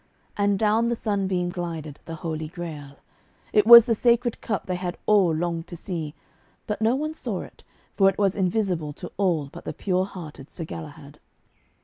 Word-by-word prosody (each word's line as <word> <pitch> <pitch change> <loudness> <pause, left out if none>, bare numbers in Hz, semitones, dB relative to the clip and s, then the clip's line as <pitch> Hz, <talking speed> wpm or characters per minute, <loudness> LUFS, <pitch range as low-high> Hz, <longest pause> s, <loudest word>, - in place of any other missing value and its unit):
And 205 -1 +2
down 220 +3 +2
the 240 - 0
sunbeam 190 -5 -1
glided 165 -4 -5
the 165 - -6
Holy 155 -1 -3
Grail. 155 -4 -8 0.6
It 210 0 +4
was 235 -1 +12
the 235 - +2
Sacred 240 +1 +2
Cup 210 -3 -2
they 185 - -2
had 180 -1 -4
all 200 -5 +4
longed 165 +1 -2
to - - -8
see. 165 -3 -5 0.5
But 210 0 -3
no 225 +3 +3
one 305 +3 -2
saw - - -4
it, - - -13 0.3
for 195 -1 +5
it 195 - -4
was 200 -2 +2
invisible 180 -5 0
to 175 - -9
all 170 -8 +1
but - - -9
the - - -5
pure 185 -1 0
hearted 160 -7 -10
Sir 165 - -7
Galahad. 150 -2 -9
180 Hz, 180 wpm, -25 LUFS, 160-210 Hz, 0.6 s, was